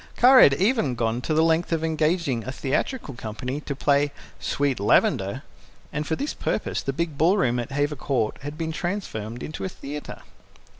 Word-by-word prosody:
Kara 255 +1 +8
had 135 - +7
even 190 - +1
gone 115 0 -1
to 155 - -4
the 160 - +4
length 165 +1 +2
of 165 -1 0
engaging 160 -5 0
a 130 - -4
theatrical 140 - -2
company 125 +5 -5
to 140 - -4
play 145 +1 +2 0.3
"Sweet 140 -4 0
Lavender," 100 - +2 0.5
and 150 +1 -2
for 160 - 0
this 285 - -3
purpose - - -2
the 135 - -2
big 155 0 -3
ballroom 160 -7 +3
at 120 - -4
Hever 145 +1 0
Court 125 -6 -1
had 145 +2 -6
been 160 -1 -2
transformed 140 - -4
into 155 - -6
a 190 - -2
theatre. 145 -3 -8
145 Hz, 180 wpm, -25 LUFS, 130-165 Hz, 0.5 s, Kara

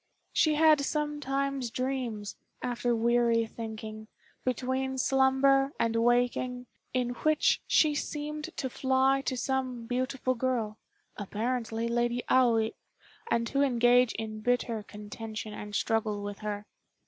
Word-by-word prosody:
She 310 -1 +3
had 310 -1 +5
sometimes 275 -3 -1
dreams, 250 -5 -3 0.3
after 245 -1 0
weary 235 0 +3
thinking, 220 -1 -7 0.4
between 260 +1 -1
slumber 270 +1 +3
and 230 0 +1
waking, 245 +1 +1 0.3
in 250 -1 0
which 305 +5 +2
she 310 -2 +4
seemed 300 +1 -4
to 265 - -1
fly 265 +1 +2
to 255 - -2
some 255 -2 -2
beautiful 255 +1 -1
girl, 235 -4 -1 0.4
apparently 225 +2 -2
Lady 240 +1 0
Aoi, 230 -4 +4 0.6
and 230 - +1
to 275 +4 0
engage 245 -2 +4
in 215 -1 -5
bitter 240 -1 0
contention 215 +1 -7
and 210 0 -7
struggle 215 -2 0
with 205 0 -6
her. 210 -1 -4
245 Hz, 120 wpm, -29 LUFS, 225-265 Hz, 0.6 s, had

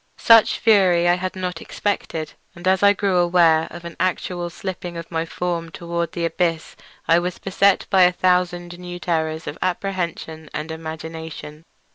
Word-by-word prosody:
Such 225 -1 +6
fury 185 -6 +4
I 175 - +5
had 185 +1 -3
not 180 -3 -4
expected, 165 -6 -3 0.2
and 175 +1 -6
as 190 0 +3
I 200 0 +7
grew 200 -2 0
aware 170 -2 +4
of 175 0 -10
an 170 - -7
actual 180 -1 -1
slipping 175 0 -6
of 165 0 -8
my 165 0 -2
form 170 -1 -3
toward 170 0 -4
the 170 -1 -2
abyss 165 -1 -1 0.3
I 165 +1 +5
was 180 +1 -3
beset 195 0 +2
by 190 - +5
a 180 0 +7
thousand 180 -1 0
new 175 0 -7
terrors 160 -2 -2
of - - -6
apprehension 175 -4 -3
and 155 +2 -4
imagination. 160 -1 -8
175 Hz, 165 wpm, -21 LUFS, 165-185 Hz, 0.3 s, I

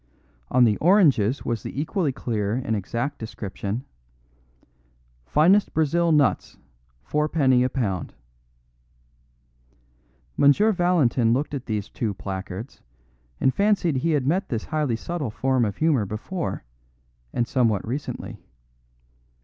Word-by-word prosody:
On 125 - +4
the 110 -3 +3
oranges 145 - +3
was 115 -2 -2
the - - -6
equally 160 0 0
clear 110 -5 -2
and 125 -3 -1
exact 115 +8 -3
description, 110 +1 -5 1.4
"Finest 185 - +3
Brazil 165 +2 +2
nuts, 150 -4 +1 0.5
4d. 150 -4 +2
a 130 - +1
lb." 100 - -2 2.3
M. 200 +11 +5
Valentin 145 -10 +2
looked 145 +4 -1
at 135 -3 -5
these 105 -2 -2
two 110 -2 -3
placards 95 +5 -7 0.6
and 130 - +2
fancied 200 -7 +2
he 160 +5 0
had 140 -4 +1
met 185 +7 0
this 115 -4 -2
highly 150 -6 -1
subtle 155 +1 -4
form 130 +3 0
of 105 - -4
humour 145 -10 +2
before, 150 - -4 0.7
and 120 - 0
that - - -21
somewhat 115 -6 +1
recently. 140 +5 -5
130 Hz, 120 wpm, -24 LUFS, 110-155 Hz, 2.3 s, M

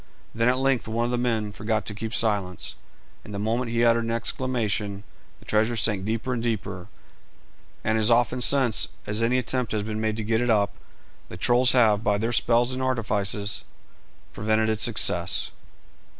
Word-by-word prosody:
Then 115 +2 +2
at 130 - +2
length 135 -3 +1
one 115 +2 -1
of 120 - -2
the 125 - 0
men 115 -4 -1
forgot 110 +1 -2
to 105 - -5
keep 110 +2 -5
silence, 100 -6 0 0.5
and 105 - -8
the - - -3
moment 115 +4 -1
he 120 0 +1
uttered 115 0 +3
an 115 - -3
exclamation 110 -4 -1 0.3
the - - -19
treasure 110 +2 +1
sank 105 -4 +1
deeper 115 +4 -2
and 120 - -2
deeper, 100 -6 -3 1.0
and 110 0 +1
as 110 +1 +3
often 120 +1 +2
since 125 -5 +3 0.2
as 105 +2 -1
any 120 +2 +2
attempt 125 -1 -2
has 105 -1 -1
been 110 0 -4
made 110 0 -1
to 110 - -3
get 110 +2 0
it 120 - 0
up, 105 -2 +2 0.6
the - - -8
trolls 125 +1 +4
have, 110 -4 +4
by 105 -2 +2
their 115 +3 -1
spells 120 +2 +2
and 130 - -4
artifices, 105 -6 -1 0.7
prevented 110 +1 +1
its 110 - -2
success. - - +1
110 Hz, 180 wpm, -25 LUFS, 105-120 Hz, 1.0 s, trolls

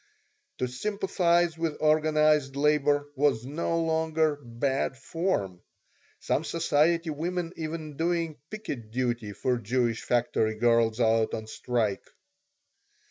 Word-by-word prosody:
To 125 - -1
sympathize 175 +2 0
with 165 -2 -1
organized 155 -2 +3
labor 145 0 +2
was 135 -5 +1
no 165 +4 -1
longer 160 -2 +1
"bad 130 +3 -1
form," 130 - -2 0.6
some 155 - 0
society 165 0 +1
women 170 +3 -3
even 155 -2 -5
doing 165 -2 -1
picket 140 - -6
duty 120 -2 -2
for 125 +5 -1
Jewish 120 +1 0
factory 115 -2 +1
girls 115 0 +3
out 115 -1 +2
on 110 - -6
strike. 110 -2 -2
145 Hz, 110 wpm, -28 LUFS, 120-165 Hz, 0.6 s, organized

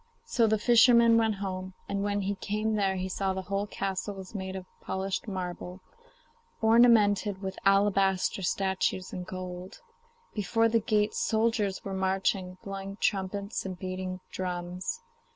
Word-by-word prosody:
So 230 -2 +2
the 220 0 +3
fisherman 235 +1 +6
went 225 -2 +3
home, 185 -1 -5
and 200 - -2
when 205 0 0
he 200 +1 -1
came 215 +2 -2
there 195 -2 +1
he 185 0 -2
saw 190 +1 -1
the 190 - -3
whole 200 +2 -2
castle 195 0 -3
was 190 0 -9
made 190 -2 -4
of 190 -1 -6 0.2
polished 190 +2 -3
marble, 180 -1 -5 0.8
ornamented 220 -3 +5
with 190 0 -4
alabaster 195 -1 +3
statues 190 0 -1
and 180 0 -5
gold. 185 +1 -7 0.5
Before 215 +2 +2
the 230 0 +3
gate 210 -1 +1
soldiers 220 -3 0
were 195 - -4
marching, 190 -1 0
blowing 195 0 -6
trumpets 200 +1 -1
and 185 -2 -5
beating 185 0 -4
drums. 180 - -4
195 Hz, 145 wpm, -29 LUFS, 185-210 Hz, 0.8 s, fisherman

